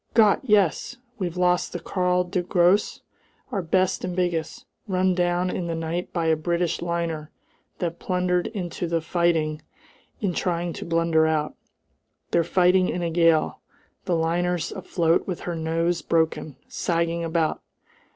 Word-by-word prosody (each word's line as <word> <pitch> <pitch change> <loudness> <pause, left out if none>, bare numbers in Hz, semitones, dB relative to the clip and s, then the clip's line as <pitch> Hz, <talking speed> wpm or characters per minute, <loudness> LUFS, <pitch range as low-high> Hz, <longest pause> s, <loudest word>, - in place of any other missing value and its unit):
"Gott! 215 -3 +5
Yes! 210 - +2 0.2
We've 180 -2 -3
lost 180 0 +2
the 175 - -3
Karl 180 +1 +1
der 180 +1 -2
Grosse, 180 +3 +2 0.5
our 195 - -1
best 185 +2 +1
and 180 -1 -3
biggest. 175 -3 -2 0.2
Run 185 -1 +2
down 175 0 +1
in 175 - -3
the 165 - -2
night 165 +2 -3
by 170 -2 -1
a 160 0 +4
British 170 +2 -1
liner 170 -3 -2 0.5
that 170 -1 -3
blundered 180 -1 0
into 180 -4 -4
the 165 0 +1
fighting 160 -2 0 0.6
in 195 -4 -1
trying 175 -1 -1
to - - -7
blunder 165 -1 +2
out. 155 -1 0 0.8
They're 170 - +3
fighting 180 +2 +3
in 175 - -2
a 170 - -1
gale. 165 -2 +3 0.5
The 180 -3 +1
liner's 170 +1 0
afloat 170 -1 0
with 180 -3 -4
her 175 - -3
nose 165 +2 0
broken, 160 -3 0
sagging 170 0 -1
about! 165 -1 0
175 Hz, 150 wpm, -24 LUFS, 165-180 Hz, 0.8 s, Gott